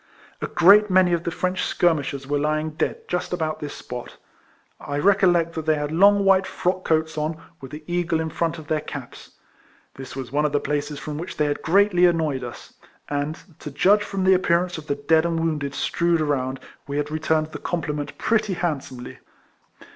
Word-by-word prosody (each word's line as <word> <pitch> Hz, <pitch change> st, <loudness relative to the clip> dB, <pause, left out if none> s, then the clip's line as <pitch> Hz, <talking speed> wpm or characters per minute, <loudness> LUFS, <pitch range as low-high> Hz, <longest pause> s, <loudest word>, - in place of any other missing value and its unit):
A -, -, -2 dB
great 200 Hz, +4 st, +6 dB
many 185 Hz, -1 st, +4 dB
of 170 Hz, 0 st, -1 dB
the -, -, 0 dB
French 180 Hz, +2 st, -2 dB
skirmishers 145 Hz, -5 st, 0 dB
were 145 Hz, +1 st, 0 dB
lying 155 Hz, +1 st, 0 dB
dead 155 Hz, -, -3 dB
just 180 Hz, 0 st, -2 dB
about 160 Hz, -3 st, -2 dB
this 145 Hz, -1 st, -6 dB
spot. 125 Hz, -1 st, -8 dB, 0.6 s
I 145 Hz, -, -4 dB
recollect 175 Hz, -1 st, +3 dB
that 160 Hz, -1 st, -5 dB
they 155 Hz, -, +4 dB
had 145 Hz, 0 st, -3 dB
long 200 Hz, +4 st, +5 dB
white 195 Hz, -1 st, +4 dB
frock 185 Hz, +1 st, -1 dB
coats 160 Hz, -1 st, 0 dB
on, 155 Hz, +2 st, -2 dB, 0.2 s
with 135 Hz, -, -8 dB
the 150 Hz, +2 st, -9 dB
eagle 175 Hz, -1 st, 0 dB
in 160 Hz, 0 st, -3 dB
front 170 Hz, 0 st, -1 dB
of 160 Hz, -, -10 dB
their 155 Hz, -1 st, -1 dB
caps. 140 Hz, -5 st, -9 dB, 0.6 s
This 130 Hz, -1 st, -9 dB
was 130 Hz, -3 st, -6 dB
one 145 Hz, +2 st, +1 dB
of 150 Hz, -1 st, 0 dB
the 145 Hz, -, +3 dB
places 145 Hz, 0 st, -2 dB
from 150 Hz, +1 st, -6 dB
which 175 Hz, -, -7 dB
they 150 Hz, -, +2 dB
had 145 Hz, 0 st, -2 dB
greatly 180 Hz, 0 st, +4 dB
annoyed 155 Hz, -6 st, 0 dB
us; 120 Hz, -1 st, -9 dB, 0.4 s
and, 145 Hz, +2 st, -2 dB, 0.2 s
to -, -, -7 dB
judge 195 Hz, +9 st, +3 dB
from 195 Hz, -2 st, -3 dB
the 190 Hz, 0 st, +5 dB
appearance 180 Hz, -2 st, +1 dB
of 155 Hz, -, -13 dB
the 140 Hz, -, 0 dB
dead 160 Hz, +3 st, +2 dB
and 170 Hz, -1 st, -1 dB
wounded 150 Hz, -4 st, -2 dB
strewed 170 Hz, -1 st, +1 dB
around, 135 Hz, -3 st, -1 dB, 0.3 s
we 140 Hz, 0 st, -3 dB
had 150 Hz, 0 st, -1 dB
i -, -, -2 dB
eturned 155 Hz, 0 st, 0 dB
the -, -, -7 dB
compliment 150 Hz, -4 st, -3 dB
pretty 215 Hz, -3 st, +1 dB
handsomely. 135 Hz, -8 st, -4 dB
160 Hz, 200 wpm, -23 LUFS, 145-175 Hz, 0.6 s, great